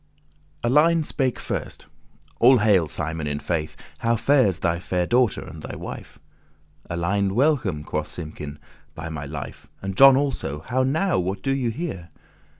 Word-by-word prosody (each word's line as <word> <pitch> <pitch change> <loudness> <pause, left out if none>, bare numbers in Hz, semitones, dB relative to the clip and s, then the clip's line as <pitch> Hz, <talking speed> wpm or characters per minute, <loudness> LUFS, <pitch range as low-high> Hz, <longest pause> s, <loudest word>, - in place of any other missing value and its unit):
Alein 155 +7 +4
spake 130 -4 0
first; - - -5 0.5
"All 130 +2 +7
hail, 105 -7 +3
Simon, 80 0 -4
in 75 0 -2
faith, 80 0 -3 0.2
How 115 0 +2
fares 115 -7 +3
thy 85 -2 0
faire 90 0 -1
daughter, 120 +1 +2
and - - -10
thy - - -7
wife." - - -8 0.7
"Alein, 95 +3 0
welcome," 120 - +1
quoth 75 0 -3
Simkin, 75 -3 -7 0.4
"by 80 0 -6
my 75 -3 -5
life, 70 -1 -7
And 95 0 -5
John 135 +2 +8
also: 130 - -2
how 125 +10 -1
now, 160 - +1
what 95 +2 -3
do 135 - 0
ye 130 -3 0
here?" 110 - -5
95 Hz, 155 wpm, -24 LUFS, 80-130 Hz, 0.7 s, John